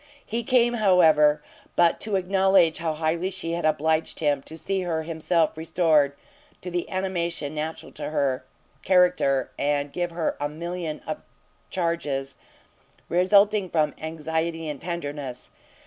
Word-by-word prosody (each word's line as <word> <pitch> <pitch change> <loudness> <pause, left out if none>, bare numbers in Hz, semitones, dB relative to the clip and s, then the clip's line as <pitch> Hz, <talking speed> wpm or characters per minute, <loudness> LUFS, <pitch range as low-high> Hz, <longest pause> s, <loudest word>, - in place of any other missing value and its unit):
He 230 +2 -2
came, 240 0 +3
however, 160 -8 +4 0.3
but 170 -1 +4
to 215 -2 -2
acknowledge 190 -3 +3
how 160 -2 -1
highly 165 +4 0
she 190 -3 -5
had 170 -1 -2
obliged 155 +1 +1
him, 145 -3 +1
to 160 - -8
see 195 +3 -1
her 165 -3 -2
himself 165 0 0
restored 160 -3 +2 0.5
to 180 - -5
the 175 0 -2
animation 175 -5 -2
natural 155 +1 -5
to - - -5
her, 135 -4 0 0.4
character, 180 -8 +3
and 145 0 0
to - - -18
give 175 -1 -1
her 165 -1 -2
a 145 0 -1
million 170 0 -5
of 155 - -4 0.5
charges, 145 -6 -2 0.7
resulting 200 +2 +4
from 155 -3 +1
anxiety 160 +1 -3
and 150 -2 -5
tenderness. 145 -7 -5
165 Hz, 140 wpm, -25 LUFS, 150-180 Hz, 0.7 s, however